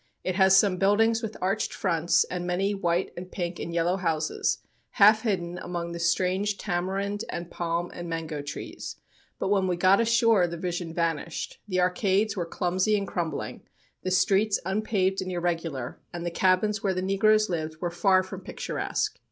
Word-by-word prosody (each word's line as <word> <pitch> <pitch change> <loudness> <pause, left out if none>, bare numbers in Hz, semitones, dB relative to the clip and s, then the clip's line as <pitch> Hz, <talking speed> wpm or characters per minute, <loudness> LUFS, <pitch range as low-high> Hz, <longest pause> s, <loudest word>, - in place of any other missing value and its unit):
It 185 - -1
has 190 0 +5
some 190 -2 +4
buildings 225 +4 +3
with 220 -2 -5
arched 195 +3 0
fronts 170 -3 +2
and 180 -1 -5
many 195 +3 0
white 175 -2 0
and 180 +1 -8
pink 175 -1 -4
and 170 - -4
yellow 170 +2 +1
houses, 165 -4 0 0.4
half 215 +2 +6
hidden 180 -5 -2
among 175 -1 -4
the 170 - -5
strange 185 +4 +1
tamarind 195 +3 -2
and 170 0 -5
palm 170 0 -2
and 175 -1 -6
mango 160 -2 -3
trees, 145 0 -7 0.4
but 190 - -2
when 195 -2 +2
we 180 - +1
got 185 +4 +4
ashore 230 -5 +4
the 170 0 -5
vision 175 -1 -3
vanished. 165 -1 -2
The 185 -2 +1
arcades 195 +3 +1
were 175 -4 -2
clumsy 185 +4 +1
and 200 -1 -3
crumbling, 170 -3 -3 0.4
the 185 - -2
streets 200 +3 +3
unpaved 195 -1 0
and 185 0 -4
irregular, 165 -7 -3
and 175 0 -5
the 175 - -2
cabins 190 +4 +2
where 195 -4 0
the 185 - -1
negroes 215 +3 +3
lived 160 -3 -3
were 175 0 -2
far 185 +2 +3
from 185 0 -8
picturesque. - - -3
185 Hz, 175 wpm, -27 LUFS, 170-200 Hz, 0.4 s, half